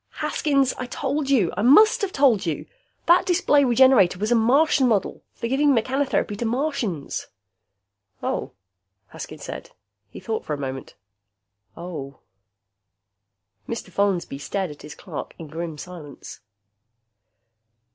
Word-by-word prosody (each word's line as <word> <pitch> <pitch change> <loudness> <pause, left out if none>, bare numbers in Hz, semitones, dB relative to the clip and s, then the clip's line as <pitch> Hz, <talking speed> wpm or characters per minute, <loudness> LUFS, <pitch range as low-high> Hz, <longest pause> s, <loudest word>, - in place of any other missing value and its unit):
"Haskins, 275 -3 +1
I 255 - -4
told 275 +2 -2
you. 225 -11 +2
I - - -2
must 430 - +6
have 400 -2 -1
told 265 - +3
you! 160 -4 -3 0.4
That 345 +1 +5
display 295 -5 +3
Regenerator 245 -7 +5
was 215 +4 -2
a - - +5
Martian 265 +4 +3
model. 215 -5 0
For 230 - -4
giving 275 +2 +3
mechanotherapy 255 -2 0
to 240 - -2
Martians." 230 - -2 1.0
"Oh," - - -2 0.6
Haskins - - -9
said. - - -7 0.4
He - - -10
thought 220 -1 -3
for 150 - -3
a - - -8
moment. 135 -2 -6 0.8
"Oh." 155 -6 -7 1.5
Mr. 230 -5 -5
Follansby 185 -7 -1
stared 190 +3 -3
at 145 - -13
his 150 0 -10
clerk - - -8
in 165 - -8
grim 160 0 -5
silence. 160 -3 -10
225 Hz, 130 wpm, -23 LUFS, 170-275 Hz, 1.5 s, must